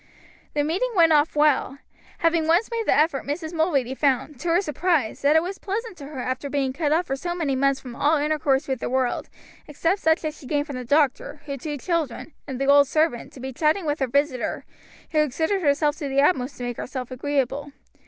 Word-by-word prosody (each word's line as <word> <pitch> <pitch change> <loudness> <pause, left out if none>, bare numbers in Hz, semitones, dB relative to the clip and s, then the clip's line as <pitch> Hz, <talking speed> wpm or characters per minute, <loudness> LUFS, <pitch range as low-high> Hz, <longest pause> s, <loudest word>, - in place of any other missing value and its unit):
The 290 - +2
meeting 355 +12 0
went 330 -3 +5
off 300 +1 +3
well. 295 -2 +2 0.4
Having 330 -1 +1
once 345 +9 +2
made 460 -2 -2
the - - +4
effort 305 -2 +2
Mrs. 315 +3 -4
Mulready 295 -6 +1
found, 270 0 0
to 345 - -5
her 335 +1 +4
surprise, 310 - 0
that 285 +2 +4
it 320 - +5
was 380 +2 -5
pleasant 430 +2 -4
to 280 - -9
her 295 -2 -9
after 260 +3 -3
being 270 -2 -1
cut 295 0 -1
off 335 +3 +2
for 270 - -2
so 345 +5 -4
many 300 -6 -1
months 275 0 +2
from 245 -2 -9
all 300 +4 +2
intercourse 295 -2 +1
with 265 -3 -2
the - - -3
world, 255 -1 -1 0.4
except 330 +6 0
such 320 +1 +2
as 305 0 -3
she 265 - -11
gained 290 0 0
from 285 -4 -6
the 250 - -6
doctor, 290 +1 +1
her 280 -2 -4
two 295 +2 -5
children, 320 -2 -3
and 265 -2 -5
the 275 - 0
old 285 0 +6
servant, 310 -4 0
to - - -12
be 265 +1 -6
chatting 315 +6 +1
with 295 0 -1
her 265 - +1
visitor, 280 0 -1 0.5
who 310 - +2
exerted 320 +7 0
herself 295 -1 +2
to 295 - -4
the 270 +1 +1
utmost 275 -3 +2
to 245 - -6
make 245 -1 -4
herself 255 -1 -5
agreeable. 280 +1 -2
290 Hz, 220 wpm, -24 LUFS, 270-320 Hz, 0.5 s, old